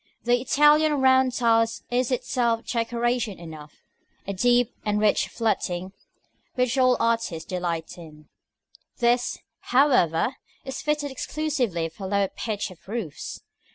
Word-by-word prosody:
The 240 +1 +2
Italian 295 +3 +4
round 260 0 +4
tile 230 -2 +3 0.2
is 250 +1 +1
itself 240 -2 0
decoration 235 -2 -1
enough, 155 -3 -11 0.4
a 200 - -3
deep 245 +4 +2
and 210 -1 0
rich 210 -1 +2
fluting, 190 -5 -2 0.6
which 250 0 +1
all 255 -1 +4
artists 230 -8 -1
delight 175 -2 -3
in; 155 -2 -13 0.7
this, 240 0 +1 0.2
however, 250 - +2 0.3
is 265 0 -5
fitted 300 -1 -1
exclusively 260 - -2
for 190 +4 -8
low 200 0 +1
pitch 205 -3 -3
of 180 - -17
roofs. 200 -8 -6
235 Hz, 120 wpm, -25 LUFS, 185-255 Hz, 0.7 s, Italian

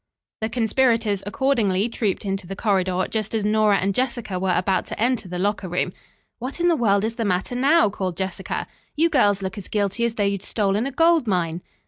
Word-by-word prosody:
The 220 - -2
conspirators 230 -3 +1
accordingly 215 -5 +1
trooped 215 -4 -2
into 195 -2 -3
the 195 - -5
corridor, 185 -3 +1
just 220 0 -3
as 215 -2 0
Nora 210 -1 +3
and 195 +1 0
Jessica 235 -5 -2
were 185 -1 +1
about 185 0 0
to - - -6
enter 235 -3 +1
the 180 0 -5
locker 200 0 -1
room. 180 +1 -1 0.5
"What 255 +7 -6
in 350 0 +3
the 335 - +4
world 200 -6 +2
is 225 +1 -4
the 230 - -1
matter 190 +2 -1
now?" 270 0 +4
called 185 -4 -3
Jessica. 190 0 -3 0.3
"You 325 +2 +2
girls 205 -8 +3
looks 190 +2 -4
as 195 - -9
guilty 205 +2 -1
as 230 -1 -2
though 210 - 0
you'd 200 -1 0
stolen 205 +3 0
a - - -4
gold 330 -1 +3
mine." 175 -3 0
205 Hz, 205 wpm, -23 LUFS, 190-235 Hz, 0.5 s, the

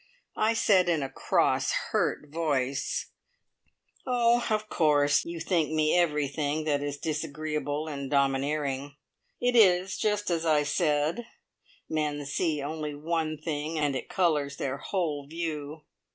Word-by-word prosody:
I 220 +1 +3
said, 190 -5 +4
in 160 -4 +1
a 135 - -5
cross, - - +1 0.2
hurt 150 - 0
voice: 140 -5 -1 1.0
"Oh, 240 -1 +3
of 215 0 0
course, 145 -5 +3
you 170 0 -5
think 165 -1 +1
me 155 0 +2
everything 150 -2 +1
that 145 -2 0
is 145 0 -3
disagreeable 150 0 -3
and 140 -3 -5
domineering. 140 0 0 0.4
It 245 0 +1
is 190 -4 +4
just 210 -2 0
as 165 -1 0
I 155 -2 +3
said 155 +8 0 0.6
men 150 -2 -2
see 150 0 -1
only 150 0 -4
one 155 +1 -2
thing, 155 +1 -3
and 145 -3 +1
it - - -5
colours 150 -6 +1
their 135 0 -2
whole 150 -6 -2
view. 155 -2 -5
155 Hz, 135 wpm, -28 LUFS, 145-170 Hz, 1.0 s, said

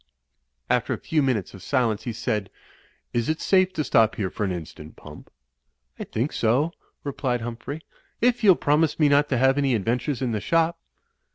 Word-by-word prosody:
After - - +1
a - - -9
few 155 -2 0
minutes 125 -9 -1
of 95 - -11
silence, 115 -4 0
he 120 - -2
said, 105 -3 -2 0.6
"Is 120 +2 0
it 155 - 0
safe 185 -1 +3
to 155 - -1
stop 110 -4 +3
here 95 -4 -2
for 105 - -3
an 100 - 0
instant. 80 -3 -8
Pump?" - - -13 0.7
"I - - -4
think 120 +7 -2
so," 125 +9 +1 0.3
replied 135 -4 -2
Humphrey, 120 +6 -6 0.4
"if 240 0 +2
you'll 195 -4 +7
promise 150 +2 +1
me 150 -2 +5
not 145 +1 +3
to 130 - +1
have 135 +3 +3
any 135 -3 +2
adventures 120 +5 -1
in 125 - 0
the 105 -2 -2
shop." 165 0 +1
130 Hz, 185 wpm, -24 LUFS, 110-150 Hz, 0.7 s, you'll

